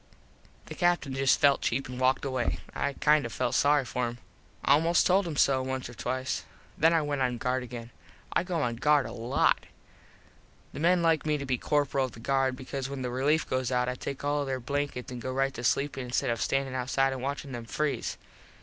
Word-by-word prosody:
The - - -8
Captin 175 -6 +1
just 135 0 +3
felt 140 -1 +4
cheap 130 +3 -1
an 125 0 -7
walked 130 +2 +2
away. 130 -3 -1 0.2
I 140 - -1
kind 150 +1 +3
of 120 - -5
felt 125 +1 -1
sorry 145 -1 +3
for 120 +2 -1
him. 120 0 -6 0.5
Almost 165 +5 +4
told 185 0 +3
him 160 - -4
so 135 -1 +4
once 130 0 -3
or 120 - -10
twice. 130 +2 -3 0.3
Then 165 +1 +4
I 165 -2 +3
went 145 -2 -2
on 125 -2 +1
guard 125 +2 -1
again. 120 -1 -8 0.4
I - - +3
go 175 -4 -2
on 120 -1 -1
guard 150 +1 +3
a - - -6
lot. 120 +3 +1 1.1
The - - -6
men 175 +2 +3
like 165 -2 +2
me 150 -1 +2
to 140 - -5
be 130 -2 -1
corperal 145 -2 +1
of 130 - -8
the - - -11
guard 135 +1 +1
because 135 0 -5
when 140 -2 -5
the 125 - -2
relief 145 +5 +1
goes 130 -1 -1
out 125 0 +1
I 125 - 0
take 135 +2 -6
all 145 0 +1
their 135 -1 -2
blankets 140 0 -3
an 125 - -5
go 130 +2 -4
right 135 +1 0
to 120 - -7
sleep 140 +3 +1
instead 125 0 -1
of 115 -2 -2
standin 135 +1 0
outside 130 +1 +1
an 130 - -5
watchin 140 +1 -4
them 120 -2 -6
freeze. 140 +1 -2
135 Hz, 220 wpm, -29 LUFS, 125-145 Hz, 1.1 s, felt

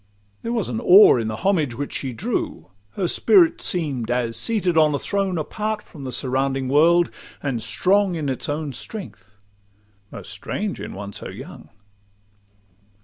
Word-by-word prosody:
There 230 - -4
was 230 -6 -1
awe 175 - +6
in 115 -2 -2
the 110 - -3
homage 160 -11 +1
which 140 +3 -5
she 135 - -2
drew; 115 - -4 0.2
Her 190 -3 -1
spirit 185 -2 +4
seem'd 140 -10 0
as 120 -2 -1
seated 200 -7 0
on 155 -2 +4
a - - +1
throne 195 +2 -1
Apart 210 +7 -3
from 145 -5 -11
the 130 - -4
surrounding 135 +1 0
world, 165 +4 +4 0.3
and 130 -5 -2
strong 190 - +1
In 155 -3 -3
its 130 +1 -2
own 145 -1 -3
strength—most 100 - -11
strange 210 -1 -4
in - - -7
one 100 +1 -7
so - - -7
young! - - -11
145 Hz, 150 wpm, -22 LUFS, 115-185 Hz, 0.3 s, awe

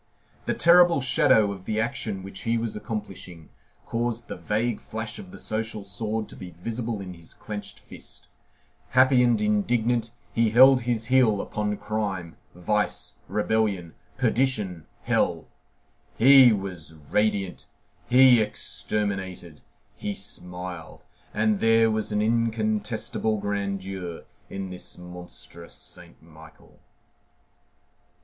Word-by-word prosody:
The - - 0
terrible 175 -2 +6
shadow 125 -6 +4
of 95 -2 -9
the 110 0 -1
action 110 -5 -2
which 95 0 -8
he 115 +2 0
was 115 -1 -3
accomplishing 95 -7 -7 0.4
caused 120 0 -2
the - - -4
vague 110 +2 -1
flash 110 - -5
of 195 -3 -10
the 195 - -11
social 110 -1 -3
sword 110 +2 -2
to - - -9
be 90 -3 -10
visible 115 +1 -3
in 90 -2 -7
his 85 -2 -11
clenched 105 -1 -6
fist; - - -10 0.6
happy 130 0 +5
and 120 -3 +3
indignant, 115 +2 +1 0.2
he 115 -1 +3
held 130 +3 +7
his 115 -2 -1
heel 125 -5 +4
upon 105 0 -2
crime, 100 -5 -3 0.2
vice, 105 +4 -1
rebellion, 105 -4 0 0.2
perdition, 105 - 0 0.2
hell; - - +1 0.7
he 130 +1 +8
was 95 -6 -4 0.2
radiant, 100 -3 0 0.4
he 125 -2 +7
exterminated, 95 -6 -2 0.3
he 105 - -4
smiled, 90 -3 -5 0.3
and 105 -1 +1
there 115 0 +4
was 110 0 -2
an 105 0 +1
incontestable 110 -1 0
grandeur 100 -3 -4 0.3
in 95 -1 -5
this 90 - -6
monstrous 90 -1 -9
Saint - - -7
Michael. 80 0 -17
105 Hz, 120 wpm, -26 LUFS, 95-115 Hz, 0.7 s, he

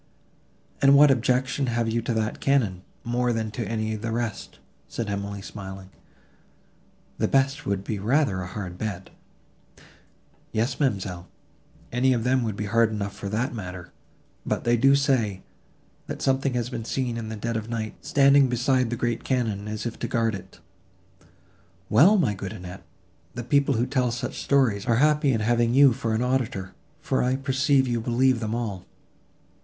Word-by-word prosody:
"And 140 0 +6
what 145 0 +7
objection 130 +2 +1
have 120 -1 0
you 115 +1 0
to 115 - -2
that 110 0 -2
cannon, 115 -10 +1 0.2
more 120 +1 0
than 110 -2 -2
to 110 0 -4
any 110 0 -2
of 110 - -5
the 115 0 -3
rest?" 115 -2 -4 0.3
said 110 -3 -4
Emily 100 0 -4
smiling: 95 -2 -9 1.3
"the - - +2
best 135 +1 +1
would 100 -1 -1
be 105 0 -3
rather 110 -2 +1
a 90 - -5
hard 95 -2 -7
bed." 100 -4 -5 1.4
"Yes, 120 +3 -1
ma'amselle, 95 - -1 0.6
any 130 +2 +3
of 115 -2 -1
them 130 +1 +2
would 110 -4 -2
be 105 - -4
hard 115 +2 +3
enough 100 -2 -4
for 100 0 -6
that 115 +5 -1
matter; 90 -5 -7 0.5
but - - -2
they 120 0 +3
do 135 +4 +5
say, 120 -9 +1 0.6
that - - -5
something 135 -1 +1
has 120 +1 -2
been 115 -2 -4
seen 125 0 -2
in 115 -1 -5
the 110 - -5
dead 115 +2 -3
of 110 0 -4
night, 110 -2 -3
standing 140 -1 +5
beside 125 0 +1
the 120 - -2
great 120 0 -2
cannon, 110 -6 -1
as 105 +1 -5
if 115 - -5
to - - -2
guard 115 -1 0
it." 95 -1 -9 1.3
"Well! 170 - +6
my 130 - +2
good 95 0 -6
Annette, 90 -2 -9 0.5
the 120 - -4
people 140 +2 +2
who 115 +2 +1
tell 130 -2 0
such 120 +1 -4
stories, 125 -8 +2
are 115 - +3
happy 150 +2 +3
in 115 -3 0
having 120 +2 +2
you 140 -2 +7
for 115 -3 -2
an 115 - 0
auditor, 120 -7 -1 0.3
for - - 0
I 125 +1 +1
perceive 135 0 +2
you 120 -2 -1
believe 125 +2 +2
them 110 0 -2
all." 105 -6 -4
115 Hz, 175 wpm, -25 LUFS, 105-130 Hz, 1.4 s, what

